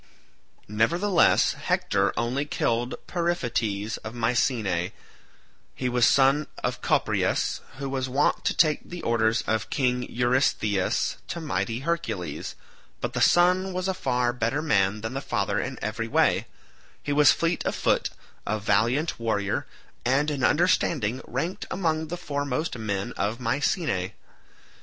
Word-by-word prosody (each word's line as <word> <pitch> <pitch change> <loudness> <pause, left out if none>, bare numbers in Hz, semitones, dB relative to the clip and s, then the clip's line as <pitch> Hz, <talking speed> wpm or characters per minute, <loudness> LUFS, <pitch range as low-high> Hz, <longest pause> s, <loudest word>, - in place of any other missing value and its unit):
Nevertheless 170 - +3
Hector 100 -1 0
only 120 +4 0
killed 120 -4 -1
Periphetes 120 - -1
of 110 +2 -8
Mycenae; 115 -6 0 0.8
he 125 - -1
was 120 -2 +4
son 140 +2 +4 0.2
of - - -2
Copreus - - +1 0.2
who 140 0 -4
was 130 -1 -2
wont 140 +3 +1
to - - +1
take 155 -3 +4
the 175 -2 -7
orders 115 0 +2
of 110 -1 -1
King 125 -2 +1
Eurystheus 120 -5 +1
to 170 - -4
mighty 125 -6 -2
Hercules, 140 - -3 0.4
but - - -3
the - - -1
son 180 +2 +4
was 185 +1 -2
a 190 - +1
far 125 -8 0
better 120 +5 -1
man 105 -7 +2
than 110 +3 -4
the 135 - -3
father - - -1
in - - -4
every - - -2
way; - - +2 0.6
he 145 - -1
was 145 -2 +6
fleet 170 +1 0
of - - -1
foot, - - +1 0.4
a 110 - 0
valiant 120 +10 +1
warrior, 105 -3 -1 0.4
and 140 +5 +2
in 140 -3 -3
understanding 145 - +2
ranked 160 +9 -3
among 160 -4 -1
the 175 +3 -4
foremost 145 -2 -2
men 100 -4 -3
of 110 +4 -1
Mycenae. 120 - -1
125 Hz, 140 wpm, -26 LUFS, 110-155 Hz, 0.8 s, was